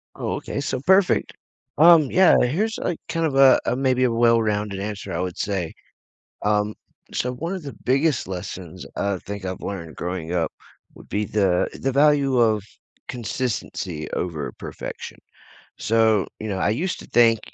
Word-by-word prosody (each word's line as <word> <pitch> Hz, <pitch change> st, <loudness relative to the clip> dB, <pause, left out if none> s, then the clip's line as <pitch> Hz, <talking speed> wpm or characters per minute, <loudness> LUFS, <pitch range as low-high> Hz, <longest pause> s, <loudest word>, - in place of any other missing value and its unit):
Oh, -, -, -3 dB
okay, -, -, -5 dB
so -, -, -2 dB
perfect. 190 Hz, +3 st, +3 dB, 0.4 s
Um, 165 Hz, 0 st, +8 dB
yeah, 185 Hz, 0 st, +6 dB
here's 195 Hz, -, 0 dB
a, 175 Hz, -, -1 dB
kind 165 Hz, -1 st, 0 dB
of 140 Hz, -3 st, -1 dB
a 135 Hz, -1 st, +7 dB
a, 120 Hz, -, +1 dB
maybe 130 Hz, -1 st, +1 dB
a 125 Hz, -, +3 dB
well-rounded 110 Hz, -4 st, +2 dB
answer, 100 Hz, 0 st, -5 dB
I 85 Hz, -, -2 dB
would 90 Hz, -1 st, -3 dB
say. 95 Hz, -5 st, -2 dB, 0.7 s
Um, 105 Hz, 0 st, +1 dB, 0.4 s
so 125 Hz, -, -1 dB
one 165 Hz, +8 st, -4 dB
of 185 Hz, -, -7 dB
the 140 Hz, -, -7 dB
biggest 135 Hz, -, +1 dB
lessons 90 Hz, -1 st, -7 dB
I 100 Hz, -1 st, -1 dB
think 100 Hz, -1 st, -7 dB
I've 95 Hz, -1 st, -5 dB
learned 85 Hz, -6 st, -6 dB
growing 90 Hz, -2 st, -4 dB
up, 85 Hz, -2 st, 0 dB, 0.4 s
would -, -, -15 dB
be 105 Hz, +1 st, -1 dB
the, 95 Hz, -4 st, +1 dB
the 135 Hz, 0 st, 0 dB
value 140 Hz, -2 st, +3 dB
of 110 Hz, -4 st, +3 dB, 0.4 s
consistency 105 Hz, -, -4 dB
over 80 Hz, -5 st, -3 dB
perfection. -, -, -7 dB, 0.6 s
So, 110 Hz, -2 st, +2 dB
you 110 Hz, -, -4 dB
know, 100 Hz, -, -2 dB
I 100 Hz, -, +1 dB
used 175 Hz, -, -1 dB
to -, -, -11 dB
think, 115 Hz, -2 st, +4 dB
110 Hz, 165 wpm, -23 LUFS, 95-135 Hz, 0.7 s, Um